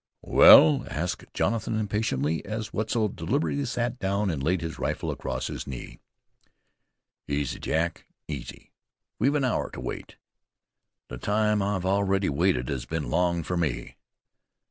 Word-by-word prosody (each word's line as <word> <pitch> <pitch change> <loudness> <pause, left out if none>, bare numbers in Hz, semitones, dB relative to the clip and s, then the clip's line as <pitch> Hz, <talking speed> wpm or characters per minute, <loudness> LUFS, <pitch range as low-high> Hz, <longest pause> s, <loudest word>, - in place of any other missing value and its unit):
"Well?" 80 -2 +8
asked 85 +4 -3
Jonathan 115 -1 -1
impatiently, 90 -8 -1
as 110 +1 -5
Wetzel 110 0 0
deliberately 140 - -1
sat 120 0 -2
down 100 0 0
and 75 -4 -3
laid 85 +5 +1
his 80 -1 -5
rifle - - -2
across - - -4
his - - -5
knees. 65 -3 -8 1.3
"Easy, 70 0 -2
Jack, 85 +1 -2 0.2
easy. 70 -6 -8 0.5
We've 140 +3 +2
an 140 -3 +2
hour 125 - 0
to - - -9
wait." - - -6 0.9
"The 60 - -7
time 105 +2 +1
I've 100 -2 -1
already 95 0 +1
waited 65 -3 +1
has 65 -4 -3
been 80 -2 -3
long 85 -1 +1
for 90 - -3
me." 75 -8 -2
95 Hz, 140 wpm, -26 LUFS, 75-105 Hz, 1.3 s, Well